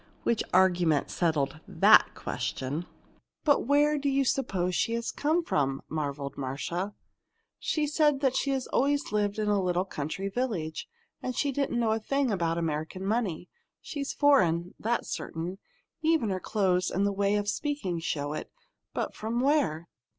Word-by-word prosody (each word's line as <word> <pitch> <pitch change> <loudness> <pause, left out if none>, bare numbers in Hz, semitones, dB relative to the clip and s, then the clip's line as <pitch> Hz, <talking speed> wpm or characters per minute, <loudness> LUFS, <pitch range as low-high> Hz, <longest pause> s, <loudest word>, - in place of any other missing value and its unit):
Which 235 - +1
argument 175 -5 +3
settled 155 -4 0
that - - +6
question. 145 +7 -3 0.6
"But 290 -5 +3
where 295 +1 +4
do 280 0 0
you 275 0 +2
suppose 190 -10 0
she 230 - +1
has 235 0 -2
come 315 +4 +1
from?" 135 - 0
marveled 140 -3 -3
Marcia. 170 +9 -3 0.6
"She 305 -2 0
said 295 -1 +2 0.2
she'd 270 -2 0
always 285 +2 +1
lived 205 -1 0
in 215 -1 -1
a 205 -1 +2
little 180 0 +1
country 160 +3 -4
village, 195 -8 -3 0.3
and 255 - -3
she 285 +2 +1
didn't 275 -3 -1
know 225 -2 +2
a 220 - +1
thing 275 +3 0
about 170 -4 0
American 165 +3 -3
money. 200 -6 -1 0.3
She's 280 -2 -4
foreign 180 - +3
that's 235 +2 -1
certain. 175 +4 -5 0.4
Even 315 -9 +2
her 185 - -1
clothes 185 -3 +1
and 195 +2 0
her 200 - +2
way 200 +1 +1
of 205 0 -1
speaking 210 - -2
show 145 -3 -2
it. - - -6 0.4
But - - -2
from 225 +2 -2
where?" 255 - +1
200 Hz, 155 wpm, -28 LUFS, 170-270 Hz, 0.6 s, that